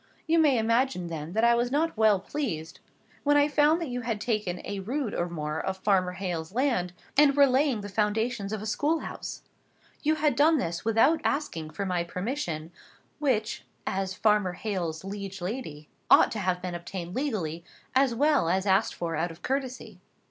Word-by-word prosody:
You 330 +1 +3
may 290 -5 +4
imagine, 230 -5 +1
then, 160 0 -5
that 220 +2 +1
I 235 0 +6
was 240 +1 +1
not 320 +4 +1
well 215 -3 +4
pleased 185 - -4 0.4
when 290 0 +4
I 290 0 +5
found 300 +2 +3
that 330 -5 -4
you 245 0 -3
had 230 -3 -2
taken 210 -6 -1
a 200 - -4
rood 240 +4 -2
or 175 0 -1
more 155 -1 -3
of 190 0 -2
Farmer 185 -2 +1
Hale's 180 -1 -4
land, 240 -9 +1 0.2
and 280 -1 +5
were 285 - +8
laying 260 -3 +2
the 205 - -6
foundations 210 +1 -1
of 215 -1 -3
a - - -5
school 295 +9 0
house. - - -7 0.6
You 310 +1 +2
had 300 -4 +1
done 310 +4 +5
this 170 - -2
without 225 +9 +3
asking 170 - -2
for 200 +5 -4
my 180 -2 0
permission, 175 - -4 0.5
which, 235 -7 0 0.2
as 190 -1 -2
Farmer 210 -4 +2
Hale's 175 -5 -3
liege 195 0 -6
lady, 175 - -5 0.2
ought - - +7
to 220 - -3
have 185 -2 -1
been 180 -1 -3
obtained 175 0 -6
legally, 185 - -2 0.3
as 260 -2 +3
well 285 - +3
as 190 +2 +1
asked 195 +2 +2
for 165 -1 -3
out 165 +3 0
of 165 +1 -13
courtesy. 260 -1 -3
210 Hz, 185 wpm, -28 LUFS, 180-265 Hz, 0.6 s, were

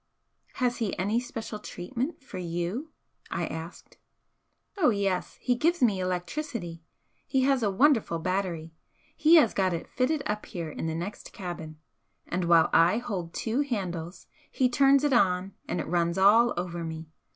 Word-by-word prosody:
"Has 250 -2 0
he 220 -4 -2
any 205 +5 +1
special 225 -3 -6
treatment 250 - -5
for 260 - -8
you?" 175 - -3 0.4
I - - -2
asked. 160 +2 -8 0.8
"Oh 355 - +4
yes, 195 -4 -1
he 250 - +1
gives 330 +6 +1
me 210 -6 +3
electricity. 185 - -3 0.5
He 265 - +2
has 270 -1 +3
a 210 - +2
wonderful 225 - +3
battery 170 -2 -2 0.4
he 320 +2 +6
has 275 -10 +6
got 190 -2 +1
it 165 - -4
fitted 275 +4 0
up 210 0 -3
here 165 -3 -5
in 160 - -4
the 160 - -2
next 175 +5 -6
cabin 165 -4 -7 0.5
and 175 0 -2
while 170 -1 +5
I 170 +6 +5
hold 190 -8 -4
two 235 +5 0
handles 180 - -4 0.2
he 255 -1 +1
turns 275 +2 +4
it 290 -2 +2
on 190 -4 +2
and - - -2
it - - -2
runs 170 +1 0
all 220 +5 +5
over 175 -1 -3
me. 160 0 -6
195 Hz, 160 wpm, -28 LUFS, 175-250 Hz, 0.8 s, he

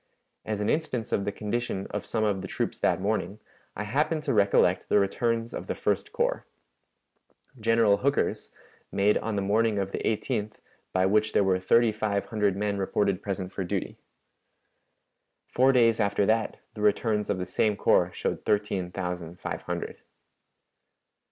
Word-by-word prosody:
As 105 -1 -2
an 105 - 0
instance 125 -7 -2
of 100 - 0
the 100 - -1
condition 105 -2 -3
of - - -4
some 110 - 0
of 100 -3 0
the 95 - -6
troops - - -3
that - - +2
morning, 100 -1 -1 0.4
I 105 - -3
happen 150 +9 0
to 145 -3 -1
recollect 100 -2 +3
the - - +4
returns 115 +3 0
of - - -6
the - - -2
First - - -1
Corps. - - 0 1.2
General 115 -2 +3
Hooker's, 140 +1 0 0.4
made 100 +2 +3
on 110 -1 -3
the 100 - 0
morning 110 +2 +2
of 95 -1 -2
the - - -3
18th, 105 -1 -1 0.4
by 95 0 +2
which 105 +2 +2
there - - +4
were 95 -1 +2
thirty 115 +5 +4
five 105 -2 -1
hundred 105 -4 0
men 100 0 -1
reported 100 0 0
present 95 -2 -4
for 95 - -3
duty. 90 - -4 1.5
Four 130 +2 +3
days 115 -3 +4
after 100 -1 +2
that, 110 +1 +1 0.2
the 105 - -8
returns 105 0 +1
of 100 - +1
the 90 - -3
same 105 +3 +1
corps - - +3
showed - - -3
thirteen 100 -3 0
thousand 90 -2 -5
five - - -4
hundred." - - -5
105 Hz, 165 wpm, -27 LUFS, 100-115 Hz, 1.5 s, the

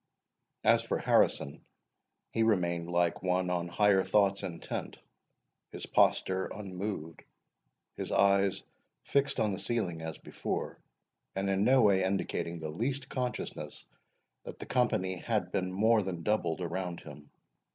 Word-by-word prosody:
As - - +5
for - - -1
Harrison, 70 - +2 0.7
he 115 - 0
remained 85 -6 +1
like 85 -1 +1
one 90 0 +1
on 90 -1 -1
higher 100 +1 +4
thoughts 100 0 +2
intent; 85 -2 -5 0.7
his - - -7
posture 95 0 +2
unmoved, 95 -5 -6 0.7
his - - -4
eyes 100 -1 +3 0.4
fixed 140 0 +1
on 105 - +2
the 95 - -4
ceiling 95 -6 -2
as 80 -1 -5
before, - - -4 0.6
and 95 +1 -1
in 95 +1 +2
no 130 +1 +5
way 95 -3 +4
indicating 95 -3 -2
the 80 -1 -5
least 130 - -3
consciousness 125 -1 -4 0.6
that - - -8
the - - -8
company 110 -7 +1
had - - -1
been 90 -1 -1
more 110 +4 +4
than 90 -4 -4
doubled 90 -6 0
around 90 0 -3
him. 75 -1 -12
95 Hz, 135 wpm, -31 LUFS, 85-105 Hz, 0.7 s, As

